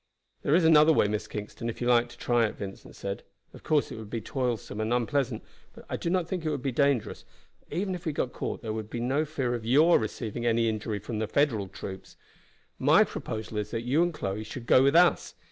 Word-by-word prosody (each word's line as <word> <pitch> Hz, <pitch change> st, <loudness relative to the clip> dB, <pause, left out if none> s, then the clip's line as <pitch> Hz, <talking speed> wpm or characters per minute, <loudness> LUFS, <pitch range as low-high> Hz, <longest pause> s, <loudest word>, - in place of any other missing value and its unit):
"There 145 Hz, -, +2 dB
is 170 Hz, -1 st, +4 dB
another 160 Hz, -1 st, +7 dB
way, 125 Hz, -, +4 dB
Miss 105 Hz, 0 st, -2 dB
Kingston, 105 Hz, +2 st, -5 dB
if 115 Hz, -, -6 dB
you 120 Hz, -, -2 dB
like 120 Hz, -1 st, +4 dB
to -, -, -14 dB
try 120 Hz, -2 st, +2 dB
it," -, -, -7 dB
Vincent 100 Hz, -1 st, -8 dB
said. 100 Hz, 0 st, -5 dB, 0.3 s
"Of -, -, -12 dB
course 150 Hz, -2 st, +1 dB
it -, -, -6 dB
would 110 Hz, -2 st, -9 dB
be 115 Hz, -, -3 dB
toilsome 120 Hz, -2 st, -3 dB
and 110 Hz, +1 st, -1 dB
unpleasant, 125 Hz, +2 st, 0 dB, 0.3 s
but -, -, -14 dB
I -, -, 0 dB
do -, -, -3 dB
not 180 Hz, -2 st, +1 dB
think 180 Hz, -2 st, -3 dB
it 155 Hz, -, 0 dB
would 145 Hz, -4 st, -3 dB
be 135 Hz, -, 0 dB
dangerous, 130 Hz, -4 st, +1 dB, 0.4 s
for -, -, -32 dB
even 190 Hz, +1 st, -1 dB
if 175 Hz, -1 st, -6 dB
we -, -, +1 dB
got 130 Hz, -3 st, -2 dB
caught -, -, -4 dB
there 110 Hz, -2 st, -3 dB
would 110 Hz, -1 st, -5 dB
be 120 Hz, -, -4 dB
no 135 Hz, +6 st, +1 dB
fear 135 Hz, -5 st, -2 dB
of 120 Hz, -2 st, -3 dB
your 150 Hz, +9 st, +5 dB
receiving 110 Hz, +1 st, -4 dB
any 115 Hz, -1 st, +2 dB
injury 110 Hz, -1 st, -2 dB
from 105 Hz, +2 st, -5 dB
the 110 Hz, -, -1 dB
Federal 115 Hz, -5 st, +1 dB
troops. 95 Hz, 0 st, -9 dB, 0.6 s
My -, -, +6 dB
proposal 110 Hz, -1 st, -5 dB
is 105 Hz, 0 st, -4 dB
that 115 Hz, 0 st, -3 dB
you 135 Hz, +7 st, +2 dB
and 175 Hz, 0 st, +2 dB
Chloe 105 Hz, -8 st, -4 dB
should 120 Hz, +2 st, -8 dB
go 130 Hz, -, +6 dB
with 140 Hz, +3 st, +3 dB
us. 175 Hz, 0 st, +4 dB
120 Hz, 240 wpm, -28 LUFS, 110-145 Hz, 0.6 s, another